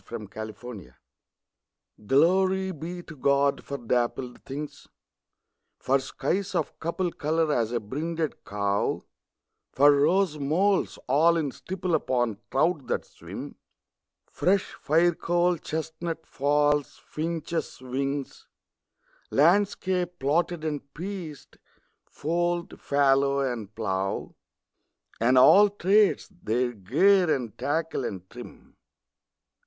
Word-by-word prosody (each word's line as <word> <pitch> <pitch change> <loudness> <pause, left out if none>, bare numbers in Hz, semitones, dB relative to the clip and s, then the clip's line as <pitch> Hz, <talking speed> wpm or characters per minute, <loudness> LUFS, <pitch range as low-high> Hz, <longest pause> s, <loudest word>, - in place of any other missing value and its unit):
13 110 -4 -8
Pied 110 0 -7
Beauty 120 -5 -9 1.2
GLORY 190 - +3
be 175 +2 -7
to 165 - -11
God 140 0 +2
for 140 - -5
dappled 120 +1 -2
things 145 +2 -7 0.9
For 135 +1 +1
skies 175 +8 -2
of - - -2
couple 170 +2 -2
colour 160 0 0
as 115 -3 0
a 120 - 0
brinded 155 +8 -4
cow; 100 0 -1 0.7
For 145 +2 +6
rose 155 +3 +2
moles 180 +8 +1
all 160 +6 +4
in 150 -4 -1
stipple 185 +4 -4
upon 120 -8 0
trout 155 0 +1
that - - -1
swim: - - -9 0.7
Fresh 190 +1 +1
firecoal 175 +2 +2
chestnut 160 +1 -4
falls; 145 +1 +1
finches' 165 0 -3
wings; 135 +2 -4 0.8
Landscape 180 +2 +2
plotted 160 +3 0
and 145 -2 -4
pieced 175 -4 -7 0.5
fold, 175 +3 -2
fallow, 140 0 +3
and 115 -6 -3
plough; 95 -3 -2 0.9
And 125 +3 +3
àll 200 +11 +8
tràdes, 200 +3 +3
their 120 0 0
gear 160 - +3
and 120 -7 -2
tackle 160 +2 -1
and 95 -5 -5
trim. - - -12
150 Hz, 105 wpm, -26 LUFS, 130-175 Hz, 1.2 s, àll